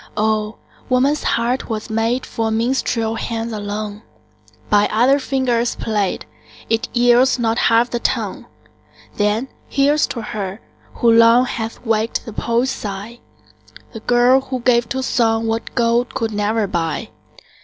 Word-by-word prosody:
Oh! 215 Hz, 0 st, 0 dB, 0.3 s
woman's 270 Hz, +4 st, +2 dB
heart 240 Hz, +3 st, -1 dB
was 220 Hz, 0 st, -4 dB
made 225 Hz, +3 st, 0 dB
For 225 Hz, -1 st, -2 dB
minstrel 230 Hz, 0 st, 0 dB
hands 225 Hz, 0 st, -4 dB
alone; 205 Hz, 0 st, -5 dB, 0.7 s
By 205 Hz, 0 st, +3 dB
other 250 Hz, +6 st, +4 dB
fingers 250 Hz, -3 st, 0 dB
played, 210 Hz, -4 st, -2 dB, 0.5 s
It 225 Hz, 0 st, 0 dB
yields 245 Hz, +2 st, +4 dB
not 230 Hz, -1 st, 0 dB
half 230 Hz, +2 st, +3 dB
the 240 Hz, -, -1 dB
tone. -, -, -2 dB, 0.7 s
Then 210 Hz, +5 st, +1 dB, 0.2 s
here's 285 Hz, +2 st, +2 dB
to 235 Hz, -, -5 dB
her, 205 Hz, -1 st, -5 dB, 0.4 s
who 235 Hz, -, +3 dB
long 230 Hz, +2 st, +6 dB
Hath 225 Hz, 0 st, -5 dB
waked 225 Hz, 0 st, 0 dB
the 225 Hz, -, -8 dB
poet's 235 Hz, +4 st, 0 dB
sigh, 210 Hz, +3 st, -6 dB, 0.7 s
The 225 Hz, -, -6 dB
girl 245 Hz, +3 st, +4 dB
who 260 Hz, -1 st, -5 dB
gave 235 Hz, -1 st, +2 dB
to 265 Hz, 0 st, -2 dB
song 225 Hz, -2 st, +1 dB
What 225 Hz, 0 st, -3 dB
gold 235 Hz, 0 st, +1 dB
could 225 Hz, -1 st, -1 dB
never 210 Hz, +1 st, 0 dB
buy. 165 Hz, -5 st, -2 dB
230 Hz, 140 wpm, -19 LUFS, 220-245 Hz, 0.7 s, long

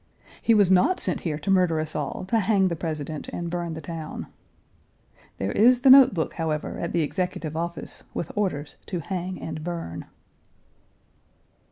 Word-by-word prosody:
He 230 Hz, -, +4 dB
was 200 Hz, -3 st, +4 dB
not 190 Hz, -, +4 dB
sent 185 Hz, -, 0 dB
here 155 Hz, -4 st, -2 dB
to 155 Hz, +6 st, -2 dB
murder 180 Hz, -4 st, +3 dB
us 155 Hz, 0 st, -3 dB
all, 150 Hz, +4 st, -3 dB
to 225 Hz, -, +3 dB
hang 195 Hz, -2 st, +3 dB
the 170 Hz, -, -2 dB
President, 155 Hz, -2 st, -4 dB
and 170 Hz, -1 st, -5 dB
burn 170 Hz, -2 st, -3 dB
the 160 Hz, -, -6 dB
town. 160 Hz, 0 st, -6 dB, 1.1 s
There 95 Hz, +1 st, -2 dB
is 245 Hz, -, +5 dB
the 265 Hz, 0 st, +7 dB
note 265 Hz, -1 st, +9 dB
book, 160 Hz, -, -1 dB
however, 155 Hz, -2 st, -3 dB
at 170 Hz, -, -3 dB
the 170 Hz, -, +1 dB
Executive 170 Hz, -2 st, -3 dB
Office, 170 Hz, +1 st, -4 dB
with 170 Hz, -, -4 dB
orders 165 Hz, -8 st, -2 dB
to 185 Hz, -, -3 dB
hang 185 Hz, +2 st, -4 dB
and 155 Hz, -1 st, -6 dB
burn. 165 Hz, -, -5 dB
170 Hz, 170 wpm, -25 LUFS, 155-190 Hz, 1.1 s, note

